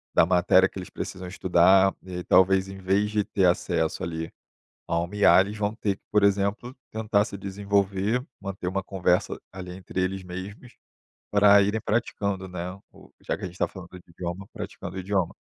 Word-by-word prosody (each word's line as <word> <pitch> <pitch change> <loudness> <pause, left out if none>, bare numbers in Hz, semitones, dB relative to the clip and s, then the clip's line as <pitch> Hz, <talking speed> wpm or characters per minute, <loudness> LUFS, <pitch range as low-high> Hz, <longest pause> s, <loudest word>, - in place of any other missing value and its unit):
da - - +6
matéria 90 +1 +4
que - - -8
eles 90 - -8
precisam 90 0 -6
estudar 95 +1 +4
e 90 -1 -6
talvez, 95 +2 +4
em 95 - -8
vez 95 +2 +1
de 105 -1 +1
ter 95 -2 +1
acesso 85 -2 +1
ali 80 -1 -4 0.6
a 85 - +1
uma 85 +4 -3
IA, 105 -2 +6
eles 105 +2 -6
vão 105 +1 -1
ter 100 -3 -1
que, - - -36
por 105 -1 +3
exemplo, 100 +5 +1 0.2
tentar 105 -2 +1
se 100 - -7
desenvolver, 100 +4 -1
manter 95 -2 -6
uma 95 +2 -1
conversa 95 0 0
ali 90 -1 -8
entre 95 0 -5
eles 95 +1 -2
mesmos, 95 +7 -8 0.6
para 100 0 +7
irem 105 +3 0
praticando, 100 -4 -1
né, 90 0 -5 0.2
o - - -17 0.2
já - - 0
que - - -14
a - - -1
gente 90 +1 -11
tá - - +2
falando 90 -3 -11
de 90 -1 -13
idioma, 90 +3 -6
praticando - - -7
o - - -2
idioma. 95 -2 -1
95 Hz, 190 wpm, -26 LUFS, 90-100 Hz, 0.6 s, para